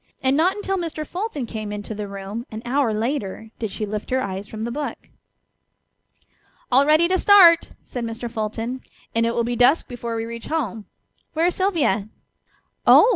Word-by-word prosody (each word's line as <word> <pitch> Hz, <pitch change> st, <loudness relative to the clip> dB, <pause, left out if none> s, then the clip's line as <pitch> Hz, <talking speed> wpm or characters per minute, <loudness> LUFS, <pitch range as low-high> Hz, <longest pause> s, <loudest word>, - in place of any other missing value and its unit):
And 265 Hz, +1 st, +3 dB
not 340 Hz, +5 st, +3 dB
until 390 Hz, -2 st, -2 dB
Mr. 320 Hz, -3 st, -4 dB
Fulton 355 Hz, -, -4 dB
came 215 Hz, -2 st, -5 dB
into 210 Hz, +1 st, -5 dB
the 210 Hz, -1 st, -5 dB
room 200 Hz, +5 st, -6 dB
an 220 Hz, +1 st, -7 dB
hour 260 Hz, -1 st, +1 dB
later 220 Hz, -1 st, -3 dB
did 220 Hz, -, -2 dB
she 215 Hz, +2 st, -4 dB
lift 210 Hz, +1 st, -5 dB
her 260 Hz, -, +1 dB
eyes 195 Hz, -4 st, -4 dB
from 220 Hz, 0 st, -6 dB
the 235 Hz, -, -3 dB
book. 290 Hz, +3 st, -3 dB, 1.7 s
"All 270 Hz, +3 st, +5 dB
ready 310 Hz, +3 st, +5 dB
to 370 Hz, +1 st, +2 dB
start!" 355 Hz, -5 st, +7 dB, 0.2 s
said 245 Hz, -, -5 dB
Mr. 230 Hz, +1 st, -4 dB
Fulton, 225 Hz, +2 st, -3 dB, 0.3 s
"and 230 Hz, 0 st, +2 dB
it 230 Hz, -, -1 dB
will 235 Hz, -, +2 dB
be 240 Hz, +1 st, -1 dB
dusk 250 Hz, +7 st, +4 dB
before 235 Hz, -2 st, -5 dB
we 225 Hz, 0 st, -2 dB
reach 230 Hz, 0 st, -7 dB
home. 235 Hz, -10 st, -2 dB, 0.5 s
Where 325 Hz, +1 st, +2 dB
is 355 Hz, -, +3 dB
Sylvia?" 300 Hz, -, +1 dB, 0.8 s
"Oh!" -, -, +8 dB
235 Hz, 185 wpm, -23 LUFS, 220-305 Hz, 1.7 s, Oh